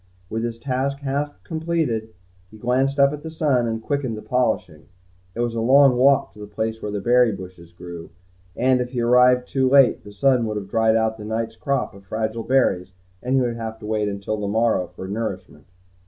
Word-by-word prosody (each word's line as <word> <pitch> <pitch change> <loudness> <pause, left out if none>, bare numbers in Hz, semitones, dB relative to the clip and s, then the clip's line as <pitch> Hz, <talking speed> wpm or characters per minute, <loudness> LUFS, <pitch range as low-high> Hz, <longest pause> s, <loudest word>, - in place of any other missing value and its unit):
With 115 +1 -2
his 120 -1 -3
task 135 +3 -2
half 140 +1 -2
completed, 160 - -2 0.4
he 110 - -14
glanced 130 +5 0
up 140 +1 +4
at 150 - -6
the 160 - -7
sun 145 -7 +1
and 115 0 -3
quickened 140 -6 -2
the 105 - -9
polishing. 110 -10 -1 0.5
It 120 - -2
was 120 -1 -1
a 115 - -2
long 135 +2 +6
walk 135 +2 +3
to 105 - -16
the 105 - -8
place 110 +1 -3
the 105 -1 -4
berry 120 +3 +4
bushes 90 -3 -10
grew, 85 -1 -9 0.5
and 130 0 +2
if 125 +1 -5
he 120 - -1
arrived 125 +1 +4
too 130 -1 +1
late, 135 -1 +5
the 105 - -11
sun 125 +2 +2
would 105 -1 -3
have 100 -1 -7
dried 110 -1 +3
out 110 0 0
the - - -7
night's 110 +1 -3
crop 140 +4 -2
of 100 0 -15
fragile 110 +3 -3
berries 100 -8 +1 0.3
and 125 +2 0
he 135 - +4
would 120 -2 -2 0.2
wait 105 -1 -1
until 100 +2 -3
the 105 -1 -3
morrow 110 -3 +1
for 90 +2 -9
nourishment. 100 -3 -5
115 Hz, 200 wpm, -22 LUFS, 105-130 Hz, 0.5 s, long